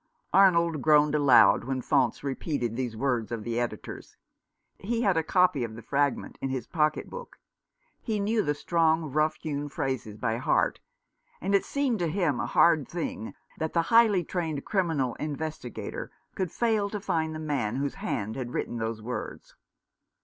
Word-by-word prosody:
Arnold 170 Hz, -5 st, +4 dB
groaned 150 Hz, 0 st, +4 dB
aloud 135 Hz, -8 st, +6 dB
when 135 Hz, 0 st, -2 dB
Faunce 120 Hz, -, +1 dB
repeated 135 Hz, -4 st, -2 dB
these 120 Hz, -3 st, -3 dB
v/ords 120 Hz, -2 st, -1 dB
of 115 Hz, -2 st, -3 dB
the 120 Hz, +1 st, -2 dB
Editor's. 120 Hz, -1 st, -5 dB, 0.6 s
He 230 Hz, +4 st, -1 dB
had 195 Hz, -4 st, +3 dB
a 160 Hz, -, +3 dB
copy 160 Hz, -4 st, +2 dB
of 110 Hz, -2 st, -5 dB
the 115 Hz, -, -10 dB
fragment 140 Hz, -1 st, -1 dB
in 135 Hz, -, -2 dB
his 130 Hz, -3 st, -3 dB
pocket 155 Hz, 0 st, 0 dB
book. -, -, -9 dB, 0.6 s
He 220 Hz, -3 st, -2 dB
knew 215 Hz, +2 st, +1 dB
the 150 Hz, -6 st, -1 dB
strong, 160 Hz, -1 st, +1 dB
rough 155 Hz, +2 st, +2 dB
hewn 145 Hz, -2 st, -4 dB
phrases 130 Hz, -6 st, -3 dB
by 115 Hz, 0 st, -1 dB
heart; 125 Hz, -, +1 dB, 0.6 s
and 195 Hz, +4 st, -2 dB
it 200 Hz, -, +3 dB
seemed 275 Hz, -6 st, 0 dB
to 175 Hz, -, 0 dB
him 160 Hz, -6 st, 0 dB
a 120 Hz, -, -1 dB
hard 160 Hz, 0 st, +4 dB
thing 165 Hz, -9 st, -5 dB, 0.2 s
that 160 Hz, 0 st, -2 dB
the 170 Hz, -, +3 dB
highly 220 Hz, -6 st, +6 dB
trained 160 Hz, -4 st, -3 dB
criminal 160 Hz, -, 0 dB
investigator 150 Hz, -4 st, -5 dB, 0.2 s
could 185 Hz, -3 st, -2 dB
fail 220 Hz, -4 st, +1 dB
to 210 Hz, -, -4 dB
find 160 Hz, -4 st, -1 dB
the -, -, -5 dB
man 135 Hz, -8 st, -1 dB
whose 140 Hz, +1 st, -1 dB
hand 105 Hz, +2 st, -2 dB
had 125 Hz, -2 st, -5 dB
written 120 Hz, -, -2 dB
those 110 Hz, -1 st, -3 dB
words. 125 Hz, +2 st, -6 dB
150 Hz, 170 wpm, -28 LUFS, 125-175 Hz, 0.6 s, aloud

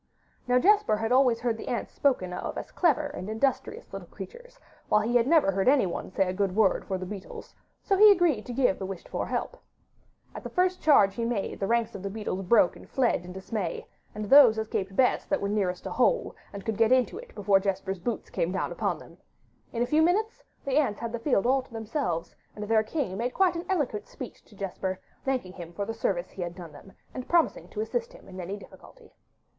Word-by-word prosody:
Now 250 Hz, 0 st, +4 dB
Jesper 405 Hz, -, +4 dB
had 225 Hz, +2 st, -2 dB
always 250 Hz, -3 st, +4 dB
heard 235 Hz, -2 st, 0 dB
the -, -, -8 dB
ants 240 Hz, -, -3 dB
spoken 185 Hz, -11 st, +1 dB
of -, -, -4 dB
as -, -, -6 dB
clever 310 Hz, -4 st, +2 dB
and 285 Hz, -9 st, -6 dB
industrious 240 Hz, +5 st, -2 dB
little -, -, -7 dB
creatures, -, -, -11 dB, 0.3 s
while 210 Hz, -, +4 dB
he 230 Hz, +3 st, -1 dB
never 280 Hz, -4 st, +4 dB
heard 195 Hz, +2 st, -1 dB
anyone 255 Hz, -11 st, +1 dB
say 190 Hz, 0 st, +1 dB
a 185 Hz, -, -2 dB
good 195 Hz, -1 st, -1 dB
word 210 Hz, -3 st, +3 dB
for 190 Hz, -, -2 dB
the 185 Hz, -, -5 dB
beetles, 195 Hz, 0 st, -9 dB, 0.3 s
so 395 Hz, -, +2 dB
he 420 Hz, +2 st, +8 dB
agreed 345 Hz, -, +2 dB
to -, -, -5 dB
give 245 Hz, -5 st, +1 dB
the 190 Hz, -, -3 dB
wished 190 Hz, -2 st, -7 dB
for -, -, -3 dB
help. -, -, -3 dB, 0.7 s
At -, -, -7 dB
the -, -, -7 dB
first 365 Hz, 0 st, +1 dB
charge 210 Hz, -11 st, +5 dB
he 230 Hz, -, -3 dB
made, 230 Hz, -4 st, -2 dB
the 195 Hz, -, -1 dB
ranks 235 Hz, 0 st, +1 dB
of 195 Hz, -, -7 dB
the 200 Hz, -, -4 dB
beetles 200 Hz, -2 st, -4 dB
broke 195 Hz, -1 st, +4 dB
and -, -, -14 dB
fled 245 Hz, -9 st, +1 dB
in 180 Hz, -, -9 dB
dismay, 190 Hz, -1 st, -4 dB, 0.3 s
and 210 Hz, 0 st, -4 dB
those 245 Hz, -1 st, +7 dB
escaped 195 Hz, -3 st, -3 dB
best 255 Hz, +2 st, +2 dB
that 290 Hz, -, +1 dB
were 200 Hz, -, -2 dB
nearest 195 Hz, -3 st, -1 dB
a -, -, -4 dB
hole, -, -, +1 dB, 0.2 s
and 200 Hz, -1 st, -8 dB
could 220 Hz, -2 st, -2 dB
get 225 Hz, +1 st, +3 dB
into 255 Hz, -, +2 dB
it -, -, -13 dB
before 200 Hz, -1 st, +3 dB
Jesper's 195 Hz, -1 st, -2 dB
boots 220 Hz, +4 st, -4 dB
came 170 Hz, -, -1 dB
down 190 Hz, -, -2 dB
upon -, -, -1 dB
them. -, -, -15 dB, 0.5 s
In 235 Hz, 0 st, 0 dB
a -, -, +1 dB
few 305 Hz, +5 st, +3 dB
minutes 415 Hz, +7 st, +1 dB, 0.2 s
the 275 Hz, 0 st, +1 dB
ants 260 Hz, -9 st, +1 dB
had 230 Hz, 0 st, -4 dB
the 235 Hz, -, -4 dB
field 230 Hz, -5 st, +1 dB
all 265 Hz, +2 st, +3 dB
to 260 Hz, -, -20 dB
themselves; 225 Hz, -, -3 dB, 0.2 s
and 210 Hz, -, -6 dB
their 220 Hz, 0 st, +4 dB
king 215 Hz, -, -3 dB
made 245 Hz, +3 st, -2 dB
quite 375 Hz, -2 st, +3 dB
an 335 Hz, -, -4 dB
eloquent 275 Hz, -, -1 dB
speech 255 Hz, -, -9 dB
to 210 Hz, -, -19 dB
Jesper, 190 Hz, -1 st, -4 dB, 0.2 s
thanking 255 Hz, -9 st, -2 dB
him 175 Hz, -2 st, -9 dB
for 200 Hz, +3 st, -3 dB
the 225 Hz, -, -4 dB
service 190 Hz, -5 st, -2 dB
he 190 Hz, -, -8 dB
had 175 Hz, 0 st, -4 dB
done 175 Hz, -4 st, -9 dB
them, 195 Hz, -, -14 dB, 0.2 s
and 255 Hz, -, -7 dB
promising 340 Hz, -1 st, +2 dB
to 425 Hz, -, -4 dB
assist 480 Hz, +2 st, -3 dB
him -, -, -15 dB
in 185 Hz, -, -9 dB
any 190 Hz, +4 st, -5 dB
difficulty. 460 Hz, -, -16 dB
225 Hz, 225 wpm, -27 LUFS, 195-280 Hz, 0.7 s, he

